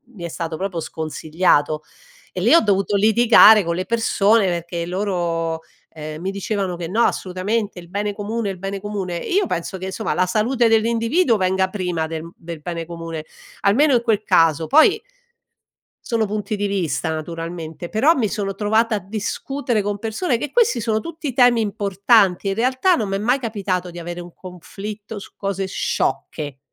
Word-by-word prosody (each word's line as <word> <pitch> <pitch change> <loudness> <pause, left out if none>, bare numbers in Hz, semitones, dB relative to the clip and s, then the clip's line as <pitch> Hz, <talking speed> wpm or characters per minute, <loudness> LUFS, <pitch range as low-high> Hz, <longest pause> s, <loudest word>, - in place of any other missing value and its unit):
mi 175 - -9
è 170 - -4
stato 165 -1 -4
proprio 185 -2 -3
sconsigliato 155 -1 0 0.5
e - - -4
lì - - +5
ho - - +7
dovuto 200 -1 +1
litigare 220 0 +7
con 170 0 -2
le 185 +1 -3
persone 225 -2 +3
perché 170 -1 -3
loro, 170 -3 -2 0.3
ehm, 155 0 -8
mi 185 - -2
dicevano 195 -1 -2
che: 170 -1 -5
"No 215 +7 0
assolutamente, 195 +2 -1
il 170 -1 -13
bene 205 +2 -2
comune 210 +1 -3
il 185 - -9
bene 195 +1 -4
comune". 195 -3 -4
Io 380 - 0
penso 175 - -3
che 185 - -5
insomma 215 +3 -2
la 185 0 +1
salute 230 +5 +2
dell'individuo 230 +6 +2
venga 190 0 +1
prima 180 -5 -2
del 160 0 -5
b 170 - -10
del 165 -2 -9
bene 170 0 -4
comune, 165 -2 -6 0.4
almeno 265 +8 +4
in 240 - +3
quel 220 -3 +1
caso 160 -3 +3
poi 380 +9 +5 1.0
sono 230 -3 0
punti 210 0 -3
di 205 0 -1
vista 165 -6 -1
naturalmente 165 +1 -5
però 270 +10 +4
mi 225 -6 0
sono 195 -2 -3
trovata 220 +2 +1
a - - -1
discutere 225 +5 -2
con 205 0 -3
persone, 230 - -1
che 290 +3 -5
questi 450 - +3
sono 220 -1 0
tutti 320 -5 -5
temi 245 -2 +5
importanti 200 -1 +2
in - - 0
realtà, 260 - +2
non 210 -8 -2
m'è 195 - -1
mai 245 +7 +1
capitato 195 -7 -3
di 175 - -8
avere 175 +1 -6
un 175 -1 -11
conflitto 205 +4 -8
su - - -12
cose 195 -1 -3
sciocche, 145 -6 -2
195 Hz, 175 wpm, -21 LUFS, 175-225 Hz, 1.0 s, ho